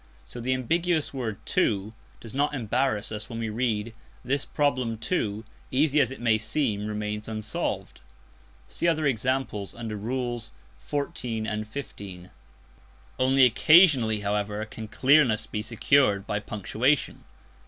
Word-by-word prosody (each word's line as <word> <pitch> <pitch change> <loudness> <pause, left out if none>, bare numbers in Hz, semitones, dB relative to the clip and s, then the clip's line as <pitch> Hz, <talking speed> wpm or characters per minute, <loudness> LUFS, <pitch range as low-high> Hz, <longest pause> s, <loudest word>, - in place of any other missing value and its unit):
So 120 - -9
the 130 +2 +1
ambiguous 165 +5 0
word 115 -6 -3
"too" 105 +1 0 0.3
does 115 - -10
not 145 +2 +1
embarrass 120 -2 0
us 110 0 -5
when 115 - -6
we 115 -1 -2
read: 110 -1 -1 0.3
"This 140 +3 0
problem, 130 -6 0
too, 110 - -2 0.2
easy 145 +2 +3
as 130 - +3
it 135 - -8
may 115 -2 +2
seem, 110 -2 -1
remains 105 0 -4
unsolved." 110 -1 -4 0.7
(See 170 - -2
other 160 -2 +2
examples 125 -5 -1
under 115 -2 -5
Rules 120 - -3 0.4
XIV. 125 -6 -2
and 105 0 -3
XV.) 95 -9 -8 0.9
Only 130 +1 +5
occasionally, 130 - +5
however, 105 +1 -1
can 110 0 -8
clearness 125 -1 +4
be 105 -1 -4
secured 110 -2 +2
by 105 - -1
punctuation. 110 +7 0
115 Hz, 130 wpm, -26 LUFS, 105-135 Hz, 0.9 s, Only